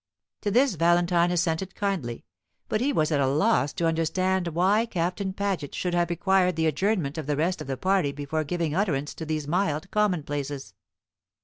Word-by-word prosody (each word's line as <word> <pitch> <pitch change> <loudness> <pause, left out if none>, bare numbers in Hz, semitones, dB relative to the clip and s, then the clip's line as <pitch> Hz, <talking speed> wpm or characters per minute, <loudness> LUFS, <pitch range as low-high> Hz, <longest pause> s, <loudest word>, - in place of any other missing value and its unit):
To 205 - -1
this 250 +4 +3
Valentine 175 +1 +3
assented 175 +1 -1
kindly, 170 - -3 0.4
but 215 - -1
he 280 +3 +2
was 155 - +1
at 145 - +2
a 135 - +2
loss 145 +1 +2
to 170 - -1
understand 175 +3 +1
why 190 +7 +2
Captain 185 +1 -2
Paget 195 -7 -3
should 180 -1 -2
have 175 -1 +1
required 180 0 +2
the 160 0 0
adjournment 160 -1 0
of 150 - -6
the 145 -1 0
rest 175 +4 0
of - - -7
the 135 -1 -3
party 185 -4 +1
before 145 +2 -3
giving 165 0 -2
utterance 155 -6 0
to 160 - -7
these 155 -2 -2
mild 165 0 -1
commonplaces. 145 -9 -1
170 Hz, 180 wpm, -26 LUFS, 150-190 Hz, 0.4 s, this